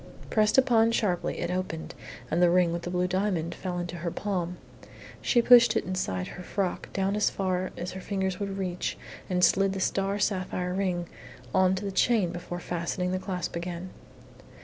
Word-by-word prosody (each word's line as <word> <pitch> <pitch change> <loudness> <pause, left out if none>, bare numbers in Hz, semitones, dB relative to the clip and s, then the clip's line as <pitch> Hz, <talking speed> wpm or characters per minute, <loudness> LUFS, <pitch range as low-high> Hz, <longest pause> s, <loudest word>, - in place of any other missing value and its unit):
Pressed 215 +1 +3
upon 235 -4 +5
sharply, 185 -6 0
it 175 - -1
opened, 180 -3 -3 0.4
and 170 - +2
the 175 - +6
ring 175 -1 +3
with 170 - -2
the 175 - -5
blue 180 0 +1
diamond 185 -3 0
fell 180 -2 -4
into 175 0 -4
her 170 +1 -2
palm. 180 -2 -3 0.6
She 240 -2 +3
pushed 235 -2 +7
it - - +1
inside 95 - -2
her 180 - -8
frock 185 0 -2
as 200 +2 +2
far 185 -1 -1
down - - -13
as 175 +2 -4
her 190 - -7
fingers 190 -2 -2
would 200 -1 -3
reach 180 -2 -2 0.3
and 180 -1 +4
slid 195 0 +3
the 195 - -3
star 195 +1 0
sapphire 185 -2 -1
ring 180 -2 -1 0.5
on 190 0 +4
to 195 +2 -4
the 200 - -2
chain 195 -2 +2
before 175 0 -6
fastening 175 +1 -2
the 185 - 0
clasp 180 -3 -4
again. 175 +1 -5
185 Hz, 185 wpm, -28 LUFS, 175-195 Hz, 0.6 s, pushed